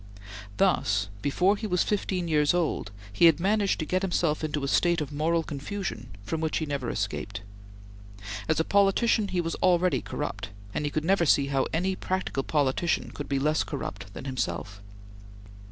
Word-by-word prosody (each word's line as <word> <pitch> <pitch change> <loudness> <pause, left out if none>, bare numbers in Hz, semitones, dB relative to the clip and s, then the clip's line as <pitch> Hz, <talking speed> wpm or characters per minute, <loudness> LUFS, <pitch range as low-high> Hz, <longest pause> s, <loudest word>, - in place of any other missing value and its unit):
Thus, 100 0 +2
before 180 - +2
he 215 - -4
was 180 -3 +2
fifteen 190 -4 -1
years 150 0 +3
old, 165 -11 0 0.2
he 170 - +5
had 165 -2 +6
managed 200 +2 +2
to 155 - -3
get 185 +4 0
himself 170 -5 0
into 150 -2 -2
a - - 0
state 170 +4 +3
of 150 -1 -4
moral 165 +3 +1
confusion 150 - -5 0.2
from 160 +10 -3
which 160 -1 0
he 160 - -1
never 140 -5 -3
escaped. 105 +1 -3 1.1
As 160 - +2
a - - +3
politician, 200 +2 +3
he 185 -2 0
was 165 0 -3
already 180 0 +3
corrupt, - - -4 0.2
and 150 - -1
he - - -3
never 190 +4 +2
could - - +1
see 140 -1 +4
how 135 -1 +1
any 185 +4 0
practical 185 -7 -2
politician 145 +3 0
could 145 - -6
be 140 - +1
less 155 +3 +2
corrupt 100 -9 -6
than - - -7
himself. 100 -6 -3
160 Hz, 175 wpm, -27 LUFS, 140-180 Hz, 1.1 s, had